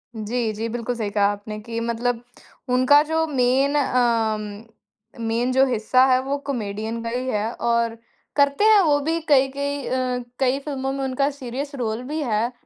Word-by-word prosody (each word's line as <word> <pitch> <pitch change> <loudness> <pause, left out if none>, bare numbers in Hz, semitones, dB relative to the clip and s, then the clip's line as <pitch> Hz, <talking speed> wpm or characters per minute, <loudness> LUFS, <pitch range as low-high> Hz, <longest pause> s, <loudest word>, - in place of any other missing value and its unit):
जी, 220 +1 -2
जी। 225 +2 -3
बिल्कुल 240 +1 -3
सही 215 -3 -2
कहा 200 0 +2
आपने 210 +1 -7
कि 230 +1 -5
मतलब 235 +1 -1 0.5
उनका 255 +4 +6
जो 320 +1 0
मेन 270 +1 +2
अम, 225 -6 0 0.6
मेन 240 +3 0
जो 265 +1 +5
हिस्सा 255 +1 +3
है 255 - +5
वो 280 +1 -1
कॉमेडियन 220 -2 -3
का 230 - -3
ही 250 +2 -3
है। 215 +1 -1
और 235 -1 0 0.4
करते 285 +6 +3
हैं 435 -1 +7
वो 295 -4 +3
भी 325 +3 -1
कई-कई 280 0 +1
अ, 255 -1 -1 0.2
कई 265 +1 +2
फ़िल्मों 270 -2 -3
में 275 0 -3
उनका 270 +2 0
सीरियस 275 +2 -6
रोल 230 -2 -2
भी 300 +4 -4
है 230 0 0
250 Hz, 170 wpm, -23 LUFS, 230-275 Hz, 0.6 s, हैं